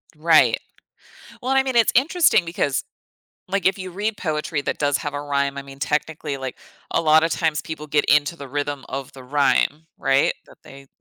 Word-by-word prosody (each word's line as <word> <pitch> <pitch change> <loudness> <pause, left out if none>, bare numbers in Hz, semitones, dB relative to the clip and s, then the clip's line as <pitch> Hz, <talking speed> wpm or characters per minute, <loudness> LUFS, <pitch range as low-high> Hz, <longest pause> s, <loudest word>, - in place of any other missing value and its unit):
Right. 160 +1 +4 0.8
Well, 255 +2 -1
I 270 0 +4
mean, 260 -2 -3
it's 230 -2 +4
interesting 290 - +4
because, 145 -5 -1 0.6
like, 200 +1 -1
if 190 - +3
you 185 -1 -6
read 205 +4 -2
poetry 155 -5 -2
that - - -3
does 145 -1 +1
have 145 -1 -5
a 145 - -3
rhyme, 140 -1 -1
I 140 - -4
mean, 135 0 -13
technically, 150 +1 -2
like, 130 -2 -6 0.3
a - - +1
lotta 160 0 +4
times 160 -2 0
people 155 -1 -7
get 145 0 +1
into 150 +3 +3
the 140 -4 -9
rhythm 145 0 -3
of 135 0 -5
the 135 - -12
rhyme, 145 +3 +1
right? 135 0 +2
That - - -18
they 135 0 -13
150 Hz, 190 wpm, -22 LUFS, 140-170 Hz, 0.8 s, Right